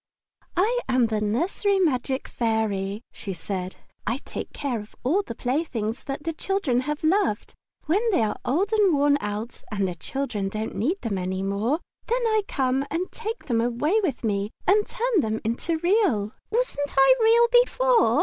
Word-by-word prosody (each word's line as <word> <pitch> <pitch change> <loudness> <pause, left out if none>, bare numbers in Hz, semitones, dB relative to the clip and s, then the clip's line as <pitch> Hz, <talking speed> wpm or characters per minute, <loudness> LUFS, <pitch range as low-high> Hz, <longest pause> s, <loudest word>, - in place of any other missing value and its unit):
"I 450 +7 +3
am 255 -2 +4
the 220 -2 -1
nursery 345 - +1
magic 270 -6 0
Fairy," 215 -3 -1
she 195 - -6
said. 185 +2 -5 0.3
"I 230 +3 +1
take - - -6
care 265 -6 -2
of 210 +1 -11
all 330 +11 +2
the 230 - -7
playthings 245 -4 -2
that 280 +1 -4
the 330 - -2
children 315 -8 0
have 300 +1 -3
loved. 320 - +1 0.3
When 345 +7 +2
they 365 - +3
are 215 - 0
old 375 - 0
and 405 -6 +4
worn 285 0 +3
out 210 +3 -4
and 200 -2 0
the 180 - -3
children 210 +2 -3
don't 215 +2 -4
need 320 - 0
them 205 -5 -2
any 185 +1 -2
more, 215 - 0 0.3
then 480 +1 +1
I 435 -1 +3
come 265 0 +1
and 345 +4 -2
take 455 +1 -5
them 230 -3 +1
away 245 - +1
with 345 -11 -2
me 205 -2 0 0.2
and 415 +2 +4
turn 485 -4 +1
them 220 -5 0
into 235 +9 -1
Real." 345 - +2 0.2
"Wasn't 430 - -1
I 270 - +7
Real 460 +1 +6 0.2
before?" - - +3
270 Hz, 175 wpm, -25 LUFS, -, 0.3 s, I